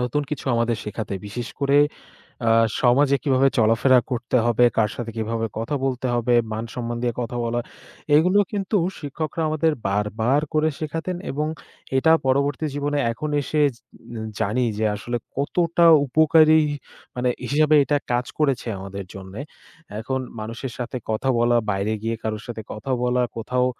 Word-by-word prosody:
নতুন 125 +4 0
কিছু 150 -3 -5
আমাদের 115 0 +1
শেখাতে। 105 -1 -4
বিশেষ 120 +4 -5
করে 140 0 +3 0.7
আ - - +5 0.3
সমাজে 135 +3 +4
কিভাবে 135 -1 +3
চলাফেরা 115 +3 +4
করতে 125 +1 0
হবে, 120 +1 +4
কার 110 -2 +3
সাথে 115 -2 -5
কিভাবে 115 +1 -1
কথা 115 +6 -2
বলতে 130 -1 -1
হবে, 120 0 +1 0.2
মান-সম্মান 115 +2 -4
দিয়ে 120 -1 0
কথা 120 +1 -4
বলা। 120 +1 -1 0.6
এগুলো 180 +6 +4
কিন্তু 205 0 -2 0.2
শিক্ষকরা 155 +2 -4
আমাদের 155 +1 +2 0.2
বারবার 110 +7 +1
করে 155 0 +3
শেখাতেন 165 +3 -3
এবং 150 +2 -1 0.5
এটা 160 +4 +4
পরবর্তী 140 +3 +1
জীবনে 145 0 -1
এখন 150 +6 -4
এসে 150 +2 0
জে - - -24 0.6
জানি 120 +6 +1
যে 110 - 0
আসলে 120 +4 -3 0.2
কতটা 170 +4 +2 0.2
উপকারী 155 +2 +5 0.6
মানে 125 0 0 0.2
হিসাবে 155 +1 +4
এটা 145 +1 +1
কাজ 120 +1 +1
করেছে 140 -5 +1
আমাদের 95 0 -7
জন্যে। 95 +2 -9 0.6
এখন 130 +4 -2 0.2
মানুষের 115 +4 -5
সাথে 125 +1 -4
কথা 120 +5 -1
বলা, 120 0 +3 0.2
বাইরে 100 +2 -1
গিয়ে 115 0 -1
কারো 110 -1 -2
সাথে 115 -2 -5
কথা 110 +5 -5
বলা, 125 0 +2 0.2
কোথাও 125 +3 0
125 Hz, 150 wpm, -23 LUFS, 115-145 Hz, 0.7 s, আ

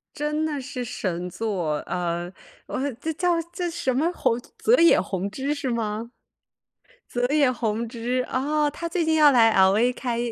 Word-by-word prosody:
真 300 +1 -1
的 300 -3 -2
是 255 -2 -5
神 180 -7 -3
作， 180 -7 -2
呃， 175 0 -3 0.3
哇 - - -4 0.2
这 320 - -2
叫 345 0 +1
叫 350 0 -2
什 330 -6 -1
么 305 +7 +1
弘 235 -8 0 0.2
泽 455 - +3
野 335 - +6
弘 195 +1 -3
之 270 +7 -2
是 270 -3 -3
吗？ 225 0 -3 1.0
泽 245 0 -1
野 290 -4 +4
弘 230 -2 -2
之， 245 +2 -2
哦， 295 +3 +1
他 335 +3 -5
最 340 0 0
近 320 0 +2
要 305 -2 +7
来 235 -4 +5
LA 200 +6 +4
开， 240 -2 -3
250 Hz, 185 characters per minute, -24 LUFS, 215-300 Hz, 1.0 s, 要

